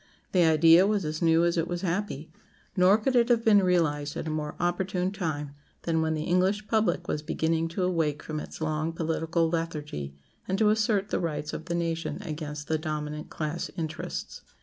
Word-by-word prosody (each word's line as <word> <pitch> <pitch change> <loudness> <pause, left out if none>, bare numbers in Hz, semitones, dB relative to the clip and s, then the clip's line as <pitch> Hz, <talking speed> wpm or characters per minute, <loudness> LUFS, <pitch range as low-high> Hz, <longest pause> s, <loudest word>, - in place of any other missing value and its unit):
The 185 - +3
idea 165 +3 +6
was 205 -4 0
as 155 +2 -3
new 165 0 +4
as 170 0 +1
it 165 - 0
was 175 0 -3
happy; 170 -4 -2 0.4
nor 185 +3 +6
could 250 +4 -1
it 240 0 +4
have 235 -1 +3
been 205 -2 +6
realized 155 -6 +1
at - - -4
a 160 - -2
more 150 -1 -3
opportune 180 +1 0
time 155 -7 -3 0.3
than 160 -1 +1
when 160 0 0
the 155 - -2
English 190 +5 +1
public 220 -1 +1
was 150 - -1
beginning 160 +1 0
to 170 +3 -3
awake 165 -5 0
from 155 -1 -4
its - - -9
long 155 +1 -1
political 165 0 0
lethargy, 150 - -4 0.3
and 190 - 0
to 215 0 +4
assert 210 -2 +1
the - - 0
rights 155 -3 -3
of 160 - -5
the 170 0 -2
nation 165 -1 -2
against 150 -1 -5
the 160 -1 0
dominant 150 -1 -4
class 155 +2 -3
interests. 160 -2 -5
165 Hz, 195 wpm, -28 LUFS, 155-185 Hz, 0.4 s, idea